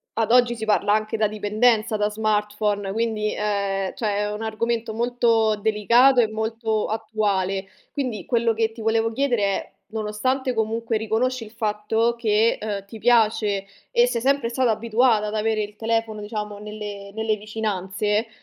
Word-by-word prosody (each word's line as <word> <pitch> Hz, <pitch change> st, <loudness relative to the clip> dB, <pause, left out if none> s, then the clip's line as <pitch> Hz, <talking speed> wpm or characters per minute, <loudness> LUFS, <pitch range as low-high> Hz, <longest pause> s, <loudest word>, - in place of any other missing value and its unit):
ad 225 Hz, 0 st, 0 dB
oggi 245 Hz, -1 st, +5 dB
si 220 Hz, -1 st, -5 dB
parla 210 Hz, -1 st, +2 dB
anche 215 Hz, +1 st, 0 dB
da 215 Hz, -1 st, +2 dB
dipendenza 215 Hz, +1 st, +1 dB
da 210 Hz, 0 st, +1 dB
smartphone, 210 Hz, -1 st, -1 dB
quindi, 215 Hz, -1 st, -1 dB
ehm, 200 Hz, -2 st, -1 dB
cioè 210 Hz, -3 st, -1 dB
è 210 Hz, 0 st, -1 dB
un 210 Hz, +1 st, -5 dB
argomento 225 Hz, +1 st, -2 dB
molto 230 Hz, -2 st, +2 dB
delicato 235 Hz, +5 st, +4 dB
e 225 Hz, -, +2 dB
molto 220 Hz, 0 st, -2 dB
attuale. 205 Hz, -3 st, -1 dB, 0.2 s
Quindi 245 Hz, -, -3 dB
quello 230 Hz, -1 st, +2 dB
che 225 Hz, 0 st, 0 dB
ti 230 Hz, -, -10 dB
volevo 225 Hz, +1 st, +1 dB
chiedere 245 Hz, -3 st, 0 dB
è: 195 Hz, -1 st, -1 dB, 0.2 s
nonostante 250 Hz, +5 st, -1 dB
comunque 225 Hz, +1 st, -1 dB
riconosci 225 Hz, +3 st, -1 dB
il 215 Hz, -, -13 dB
fatto 220 Hz, +1 st, 0 dB
che, 225 Hz, -1 st, +2 dB
ehm, 200 Hz, -2 st, -4 dB
ti 220 Hz, +2 st, -10 dB
piace 215 Hz, -4 st, +2 dB, 0.3 s
e 240 Hz, +1 st, +4 dB
sei 235 Hz, -2 st, -1 dB
sempre 270 Hz, -2 st, +1 dB
stata 245 Hz, -1 st, +1 dB
abituata 225 Hz, 0 st, +2 dB
ad 210 Hz, -, -4 dB
avere 215 Hz, 0 st, 0 dB
il 205 Hz, 0 st, -8 dB
telefono 225 Hz, -1 st, -1 dB
diciamo 210 Hz, -1 st, -5 dB
nelle 205 Hz, -1 st, -7 dB
nelle 220 Hz, 0 st, 0 dB
vicinanze, 210 Hz, 0 st, -2 dB
220 Hz, 160 wpm, -23 LUFS, 210-230 Hz, 0.3 s, oggi